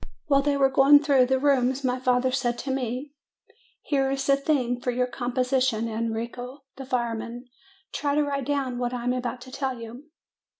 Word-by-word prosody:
While 280 Hz, -4 st, +3 dB
they 285 Hz, 0 st, +1 dB
were 270 Hz, -1 st, +3 dB
going 285 Hz, +2 st, +6 dB
through 270 Hz, -4 st, +4 dB
the 265 Hz, +1 st, +2 dB
rooms, 265 Hz, -1 st, +2 dB
my 255 Hz, 0 st, 0 dB
father 255 Hz, 0 st, +2 dB
said 250 Hz, -2 st, -1 dB
to 270 Hz, -, -4 dB
me, 260 Hz, +2 st, -3 dB, 0.7 s
"Here 270 Hz, -2 st, +1 dB
is 270 Hz, 0 st, -2 dB
the 275 Hz, -, +4 dB
theme 260 Hz, -4 st, 0 dB
for 250 Hz, -, -2 dB
your 250 Hz, +1 st, +1 dB
composition, 250 Hz, -2 st, 0 dB
Enrico, 230 Hz, +4 st, -4 dB
the 270 Hz, -1 st, -9 dB
firemen. 235 Hz, -1 st, -3 dB, 0.5 s
Try 285 Hz, -1 st, -1 dB
to 300 Hz, -, +3 dB
write 280 Hz, -2 st, -3 dB
down 270 Hz, -4 st, -1 dB
what 245 Hz, 0 st, -2 dB
I 240 Hz, -, -5 dB
am 245 Hz, +1 st, +1 dB
about 250 Hz, 0 st, -4 dB
to 255 Hz, +1 st, -11 dB
tell 265 Hz, -2 st, -3 dB
you. 230 Hz, +5 st, -9 dB
255 Hz, 185 wpm, -25 LUFS, 245-275 Hz, 0.7 s, going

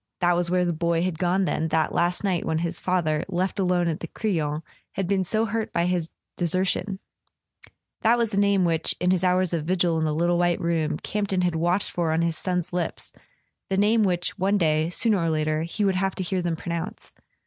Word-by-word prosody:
That 175 Hz, -1 st, +3 dB
was 175 Hz, 0 st, 0 dB
where 180 Hz, 0 st, +2 dB
the 175 Hz, -, 0 dB
boy 170 Hz, +1 st, 0 dB
had 180 Hz, -3 st, -2 dB
gone 185 Hz, +2 st, +2 dB
then, 160 Hz, -2 st, -1 dB
that 160 Hz, 0 st, 0 dB
last 175 Hz, +3 st, 0 dB
night 185 Hz, -4 st, 0 dB
when 160 Hz, -, -1 dB
his 170 Hz, +1 st, -2 dB
father, 165 Hz, -4 st, 0 dB
left 185 Hz, +2 st, -1 dB
alone 180 Hz, -2 st, +2 dB
at 160 Hz, -2 st, -1 dB
the 165 Hz, -, -6 dB
Crillon, 160 Hz, -7 st, -2 dB, 0.3 s
had 195 Hz, -2 st, -2 dB
been 195 Hz, 0 st, +1 dB
so 215 Hz, +5 st, +1 dB
hurt 225 Hz, 0 st, -2 dB
by 170 Hz, -, +1 dB
his 175 Hz, -2 st, 0 dB, 0.3 s
deser¬ 185 Hz, +2 st, +1 dB
tion! 190 Hz, +1 st, -1 dB, 1.0 s
That 235 Hz, +2 st, +4 dB
was 230 Hz, -2 st, 0 dB
the 195 Hz, -, -2 dB
name 200 Hz, -2 st, +3 dB
which, 165 Hz, -1 st, 0 dB
in 180 Hz, 0 st, +2 dB
his 185 Hz, -1 st, +1 dB
hours 180 Hz, -1 st, +2 dB
of 160 Hz, -3 st, -1 dB
vigil 175 Hz, -2 st, +1 dB
in 160 Hz, -, 0 dB
the 155 Hz, -1 st, 0 dB
little 175 Hz, +2 st, +2 dB
white 175 Hz, -1 st, +2 dB
room, 160 Hz, -2 st, 0 dB
Campton 200 Hz, -1 st, -1 dB
had 180 Hz, -1 st, +1 dB
watched 175 Hz, +4 st, +1 dB
for 170 Hz, -2 st, 0 dB
on 160 Hz, +1 st, +1 dB
his 165 Hz, -1 st, 0 dB
son's 180 Hz, 0 st, -2 dB
lips, 175 Hz, -1 st, -3 dB, 0.6 s
the 190 Hz, -, 0 dB
name 215 Hz, +3 st, +3 dB
which, 180 Hz, -1 st, -1 dB
one 195 Hz, +3 st, +2 dB
day, 155 Hz, -2 st, +2 dB
sooner 210 Hz, +3 st, +2 dB
or 165 Hz, -1 st, 0 dB
later, 155 Hz, 0 st, 0 dB
he 170 Hz, +6 st, -2 dB
would 195 Hz, -, +3 dB
have 195 Hz, +1 st, 0 dB
to 190 Hz, -, -3 dB
hear 185 Hz, +1 st, -1 dB
them 170 Hz, -1 st, -1 dB
pronounce. 170 Hz, 0 st, -5 dB
175 Hz, 225 wpm, -25 LUFS, 165-190 Hz, 1.0 s, That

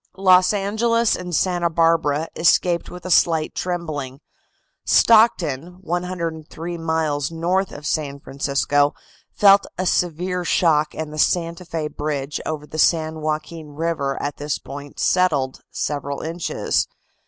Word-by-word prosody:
Los 185 Hz, -1 st, +5 dB
Angeles 220 Hz, +3 st, +1 dB
and 180 Hz, -2 st, -4 dB
Santa 175 Hz, 0 st, +1 dB
Barbara 165 Hz, -2 st, +2 dB
escaped 170 Hz, +1 st, +2 dB
with 180 Hz, 0 st, -10 dB
a 185 Hz, -, -3 dB
slight 160 Hz, -2 st, +3 dB
trembling; 155 Hz, -7 st, -4 dB, 0.6 s
Stockton, 180 Hz, -, +3 dB
103 170 Hz, -2 st, -4 dB
miles 160 Hz, -3 st, -1 dB
north 175 Hz, +4 st, -1 dB
of 145 Hz, -, -10 dB
San 140 Hz, -1 st, -2 dB
Francisco, 140 Hz, +1 st, 0 dB, 0.4 s
felt 200 Hz, -1 st, +6 dB
a 185 Hz, -, -1 dB
severe 180 Hz, +1 st, 0 dB
shock 155 Hz, -3 st, +2 dB
and 155 Hz, -1 st, -5 dB
the 155 Hz, -, -6 dB
Santa 170 Hz, +2 st, 0 dB
Fe 160 Hz, -2 st, -3 dB
bridge 145 Hz, -2 st, -4 dB
over 155 Hz, -1 st, -4 dB
the 155 Hz, +1 st, -7 dB
San 160 Hz, -1 st, +2 dB
Joaquin 155 Hz, 0 st, -4 dB
River 155 Hz, -4 st, -2 dB
at 145 Hz, 0 st, -4 dB
this 145 Hz, 0 st, -2 dB
point 140 Hz, +1 st, -10 dB
settled 150 Hz, -8 st, +1 dB
several 140 Hz, -1 st, -3 dB
inches. 165 Hz, +1 st, -1 dB
165 Hz, 130 wpm, -21 LUFS, 150-180 Hz, 0.6 s, felt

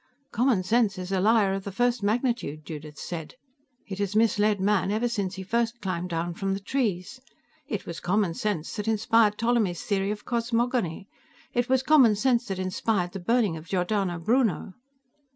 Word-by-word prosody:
"Common 235 Hz, -5 st, +2 dB
sense 215 Hz, 0 st, +2 dB
is 185 Hz, +1 st, -6 dB
a 190 Hz, -, +1 dB
liar 210 Hz, -1 st, +3 dB
of 195 Hz, 0 st, -3 dB
the 200 Hz, -, -5 dB
first 245 Hz, +3 st, +1 dB
magnitude," 215 Hz, -, -1 dB
Judith 150 Hz, -1 st, -8 dB
said. 165 Hz, +2 st, -6 dB, 0.5 s
"It 195 Hz, -2 st, -7 dB
has 200 Hz, 0 st, -2 dB
misled 215 Hz, -2 st, +3 dB
man 195 Hz, -1 st, +2 dB
ever 220 Hz, +3 st, +1 dB
since 200 Hz, -5 st, -2 dB
he 190 Hz, -, -6 dB
first 235 Hz, +4 st, -1 dB
climbed 180 Hz, -3 st, -3 dB
down 170 Hz, 0 st, -2 dB
from 195 Hz, +2 st, -2 dB
the -, -, -4 dB
trees. 210 Hz, 0 st, -2 dB, 0.5 s
It -, -, -4 dB
was 170 Hz, -, -6 dB
common 190 Hz, -1 st, +1 dB
sense 180 Hz, -3 st, -3 dB
that 210 Hz, +1 st, -4 dB
inspired 220 Hz, -1 st, +3 dB
Ptolemy's 225 Hz, -7 st, +1 dB
theory 195 Hz, -1 st, 0 dB
of 210 Hz, 0 st, -5 dB
cosmogony. 235 Hz, -6 st, -1 dB, 0.5 s
It 245 Hz, -1 st, 0 dB
was 260 Hz, 0 st, +3 dB
common 265 Hz, -7 st, +6 dB
sense 240 Hz, +2 st, +1 dB
that 195 Hz, -2 st, -3 dB
inspired 185 Hz, 0 st, -1 dB
the 195 Hz, -, -6 dB
burning 210 Hz, -1 st, +1 dB
of 160 Hz, +2 st, -11 dB
Giordano 185 Hz, 0 st, 0 dB
Bruno...." 220 Hz, +1 st, +1 dB
205 Hz, 175 wpm, -26 LUFS, 185-235 Hz, 0.5 s, common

